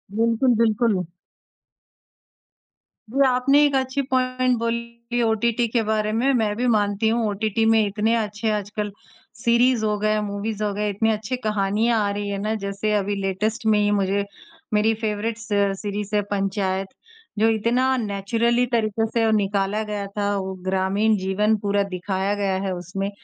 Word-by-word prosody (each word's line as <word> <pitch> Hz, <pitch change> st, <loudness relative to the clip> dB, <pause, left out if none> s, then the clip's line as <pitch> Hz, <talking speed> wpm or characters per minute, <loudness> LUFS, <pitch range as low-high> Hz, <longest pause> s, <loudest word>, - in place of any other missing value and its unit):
बिल्कुल, 230 Hz, +3 st, +2 dB
बिल्कुल। 215 Hz, -5 st, +2 dB, 2.0 s
जी, 275 Hz, +4 st, 0 dB
आपने 265 Hz, +3 st, +4 dB
एक 285 Hz, -1 st, +1 dB
अच्छी 265 Hz, +1 st, 0 dB
पॉइंट 255 Hz, -1 st, +1 dB
बोली 235 Hz, +1 st, -3 dB
ओटीटी 235 Hz, +1 st, +1 dB
के 235 Hz, -, +3 dB
बारे 215 Hz, -1 st, +1 dB
में। 260 Hz, +5 st, +2 dB
मैं 215 Hz, -4 st, +1 dB
भी 245 Hz, -, -1 dB
मानती 210 Hz, -1 st, +1 dB
हूँ, 230 Hz, -1 st, +1 dB
ओटीटी 215 Hz, +2 st, -1 dB
में 225 Hz, -1 st, +4 dB
इतने 210 Hz, +3 st, 0 dB
अच्छे 215 Hz, 0 st, -2 dB
आजकल 210 Hz, 0 st, -3 dB, 0.5 s
सीरीज़ 235 Hz, 0 st, +3 dB
हो 210 Hz, -1 st, 0 dB
गए, 215 Hz, 0 st, +1 dB
मूवीज़ 210 Hz, +1 st, -3 dB
हो 205 Hz, -1 st, -1 dB
गए, 210 Hz, +1 st, -1 dB
इतनी 220 Hz, +3 st, +1 dB
अच्छी 220 Hz, +4 st, -2 dB
कहानियाँ 215 Hz, +2 st, +1 dB
आ -, -, 0 dB
रही 205 Hz, 0 st, -3 dB
हैं 200 Hz, -1 st, -3 dB
ना। 215 Hz, +2 st, -1 dB
जैसे 200 Hz, +2 st, -2 dB
अभी 205 Hz, 0 st, 0 dB
लेटेस्ट 210 Hz, +5 st, -2 dB
में 215 Hz, -1 st, +4 dB
ही 205 Hz, 0 st, +2 dB
मुझे 200 Hz, 0 st, +1 dB, 0.5 s
मेरी 215 Hz, +2 st, +3 dB
फेवरेट 220 Hz, +1 st, -2 dB
स 225 Hz, 0 st, -11 dB, 0.3 s
सीरीज़ 205 Hz, 0 st, -3 dB
है 205 Hz, -, +3 dB
पंचायत, 195 Hz, -1 st, -1 dB, 0.5 s
जो 225 Hz, +1 st, +4 dB
इतना 245 Hz, +4 st, +2 dB
नेचुरली 230 Hz, +3 st, 0 dB
तरीके 225 Hz, -1 st, 0 dB
से 225 Hz, -2 st, +2 dB
निकाला 205 Hz, 0 st, 0 dB
गया 210 Hz, -1 st, -4 dB
था 205 Hz, 0 st, 0 dB
वो। 190 Hz, 0 st, -3 dB
ग्रामीण 190 Hz, +3 st, +1 dB
जीवन 200 Hz, +3 st, +1 dB
पूरा 200 Hz, 0 st, 0 dB
दिखाया 190 Hz, +2 st, -1 dB
गया 195 Hz, -2 st, 0 dB
है 195 Hz, -, -1 dB
उसमें। 190 Hz, +3 st, -4 dB
215 Hz, 160 wpm, -23 LUFS, 200-230 Hz, 2.0 s, आपने